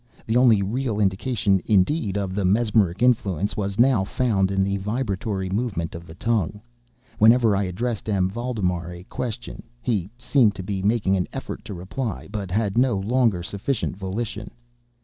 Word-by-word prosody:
The 110 - -1
only 120 -5 +5
real 115 +1 -2
indication, 100 0 +1
indeed, 105 - +2
of 95 -2 -2
the 100 +1 -1
mesmeric 105 0 +2
influence, 100 -6 +1
was 100 -1 -3
now 120 -4 +4
found 100 -3 +1
in 95 0 +1
the 100 +1 0
vibratory 100 -2 -2
movement 100 -6 -2
of 85 0 -9
the 80 - -11
tongue, 105 -2 -1 0.6
whenever 115 -1 +6
I 100 0 +1
addressed 110 +5 -3
M. 95 -3 +2
Valdemar 95 -6 -2
a 90 0 -9
question. 120 +4 -5 0.2
He 110 -7 -1
seemed 120 -4 +3
to 95 - -6
be 95 0 -3
making 100 -2 +2
an 90 - -1
effort - - -6
to 100 - -6
reply, 90 - -4
but 100 -3 -4
had 105 +3 +1
no 125 -5 +3
longer 110 -2 +1
sufficient 100 +7 -2
volition. 105 +2 -4
100 Hz, 165 wpm, -24 LUFS, 95-115 Hz, 0.6 s, whenever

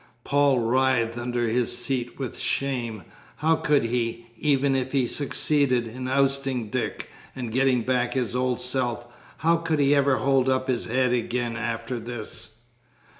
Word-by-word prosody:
Paul 140 -1 +3
writhed 120 -1 +2
under 120 0 -1
his 120 +1 +1
seat 125 -1 -2
with 130 -4 -4
shame. 120 -7 -2 0.3
How 160 +2 +2
could 150 -3 +2
he, 115 0 -2
even 140 0 +2
if 130 0 -2
he 135 -3 +3
succeeded 140 -2 +1
in 125 +3 -6
ousting 135 -4 0
Dick 130 - -3 0.3
and 125 -3 -5
getting 130 -1 +2
back 125 0 0
his 125 -2 -1
old 125 0 0
self, 125 -2 -1 0.3
how 165 +2 +3
could 165 -1 -1
he 140 0 +4
ever 140 -2 +3
hold 135 -1 +2
up 130 0 0
his 125 -2 0
head 125 +1 +1
again 120 0 -1
after 115 +1 -3
this? 110 -1 -6
125 Hz, 155 wpm, -25 LUFS, 120-135 Hz, 0.3 s, he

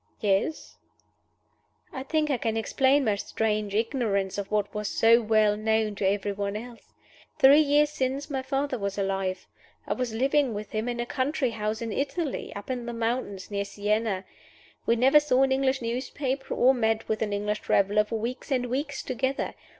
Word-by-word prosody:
"Yes." 205 +9 -1 1.2
"I 260 - -4
think 305 +2 0
I 265 - +1
can 225 -1 -1
explain 265 +5 +2
my 215 - +3
strange 210 -1 -1
ignorance 210 -4 0
of 200 - -5
what 210 -1 -1
was 210 -1 -3
so 230 +3 +4
well 215 -1 +3
known 220 0 0
to 200 -1 -1
every 205 +1 -1
one 200 0 -3
else. 235 +2 -9 0.5
Three 275 +3 +7
years 295 0 +3
since 270 0 -2
my 275 -3 -2
father 270 -1 -2
was 200 0 -3
alive. 195 -2 -2 0.4
I - - -1
was 250 -2 -2
living 265 +1 +1
with 210 +1 -6
him 220 +2 -2
in 240 0 -3
a 240 - -1
country 260 0 -1
house 215 +1 -3
in 225 - -4
Italy 285 +4 -2
up 200 +5 -6
in 245 -2 -4
the 240 - -4
mountains, 230 -4 -3
near 200 0 -1
Sienna. 205 -1 -1 0.6
We 230 - +4
never 265 +5 +6
saw 270 -3 +2
an 270 - +2
English 265 -1 +1
newspaper 260 +3 -3
or 260 +2 +5
met 225 -2 0
with 220 - -1
an 215 -2 -1
English 210 +1 -1
traveler 205 +2 +2
for 225 +2 -4
weeks 240 +4 -5
and 255 -3 +1
weeks 285 +1 -2
together. 260 +1 -2
230 Hz, 180 wpm, -27 LUFS, 210-265 Hz, 1.2 s, Three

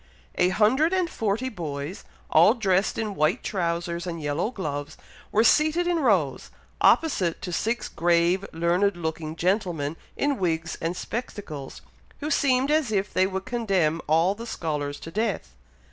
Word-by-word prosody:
A 180 - +2
hundred 255 - +3
and 370 -2 +2
forty 225 -4 -1
boys, 160 - -5 0.3
all 175 +9 +6
dressed 195 -4 +1
in 215 -2 -2
white 155 0 +1
trowsers 170 -2 -2
and 170 -1 -4
yellow 150 +6 -1
gloves, 150 - -5 0.3
were 220 - +4
seated 310 +7 +4
in 350 -1 +1
rows, 185 - +1 0.3
opposite 190 - +3
to 180 -1 -4
six 225 +7 -1
grave 175 +2 +2
learned 175 +4 +1
looking 160 -1 -4
gentlemen, 175 -5 0 0.2
in 285 -3 0
wigs 165 -2 -1
and 170 +2 -2
spectacles, 195 - -6 0.4
who 300 +1 -3
seemed 270 -1 +2
as 305 -7 +2
if 205 -1 -1
they 185 - +3
would 190 0 -4
condemn 195 -10 0
all 165 +5 +3
the 230 +3 -8
scholars 150 -7 -3
to 165 - -8
death! 200 - -2
185 Hz, 150 wpm, -25 LUFS, 165-225 Hz, 0.4 s, all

